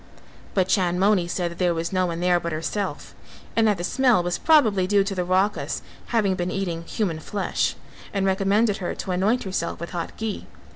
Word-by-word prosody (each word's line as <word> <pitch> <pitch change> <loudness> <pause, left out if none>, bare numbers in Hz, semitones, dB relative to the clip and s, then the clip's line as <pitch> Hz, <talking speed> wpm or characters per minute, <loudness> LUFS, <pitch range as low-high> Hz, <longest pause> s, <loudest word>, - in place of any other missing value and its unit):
But 185 -2 +3
Chandmoni 185 0 +2
said 175 0 -2
that 170 - -10
there 175 -2 +2
was 165 +2 -3
no 185 -1 +2
one 170 0 -4
there 180 -1 +3
but 170 0 -4
herself; 185 +6 -3 0.4
and 225 -1 +4
that 205 -2 +2
the 175 - -4
smell 245 -2 +3
was 175 0 -2
probably 220 - +4
due 200 0 +4
to 200 0 -3
the 180 -2 -1
Rakhas 190 +3 0 0.2
having 215 -5 +2
been 180 -1 -2
eating 180 -4 -2
human 170 -4 -2
flesh 200 +5 -1 0.4
and 195 -1 0
recommended 200 +2 +2
her 180 - -3
to 190 - -4
anoint 200 +7 +1
herself 185 -3 -3
with 170 - -6
hot 170 -2 -5
ghee. 220 -2 -4
190 Hz, 195 wpm, -24 LUFS, 175-205 Hz, 0.4 s, and